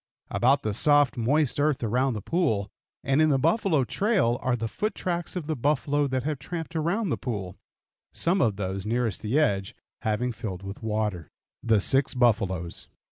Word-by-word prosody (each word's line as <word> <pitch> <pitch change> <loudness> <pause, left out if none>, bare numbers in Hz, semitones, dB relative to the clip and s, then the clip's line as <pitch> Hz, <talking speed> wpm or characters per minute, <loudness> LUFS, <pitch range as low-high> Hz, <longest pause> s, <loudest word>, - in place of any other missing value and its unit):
About 135 +3 +3
the 105 - -1
soft, 145 +2 +4
moist 135 +4 +1
earth 145 -3 +1
around 125 +3 +1
the 105 - -5
pool, 110 - 0 0.3
and 135 +3 +2
in 155 - +4
the 140 - +3
buffalo 165 - +2
trail 185 - +1
are 130 -1 +1
the 115 -1 -3
foot 205 - -3
tracks 175 -1 -3
of 175 -4 -3
the 155 0 -2
buffalo 145 +2 +1
that 130 -2 -1
have 150 -1 -2
tramped 165 +3 -6
around 175 +7 0
the - - -1
pool, 100 -8 -4 0.6
some 180 +3 +1
of 105 -4 +2
those 95 -1 -3
nearest 115 -3 -1
the 110 +7 0
edge 100 -11 +1 0.3
having 110 +3 0
filled 105 -5 -6
with 100 +1 -7
water. 105 -6 -2 0.3
THE 110 -2 +3
SIX 135 +7 +2
BUFFALOES. 100 -8 0
125 Hz, 180 wpm, -26 LUFS, 105-155 Hz, 0.6 s, soft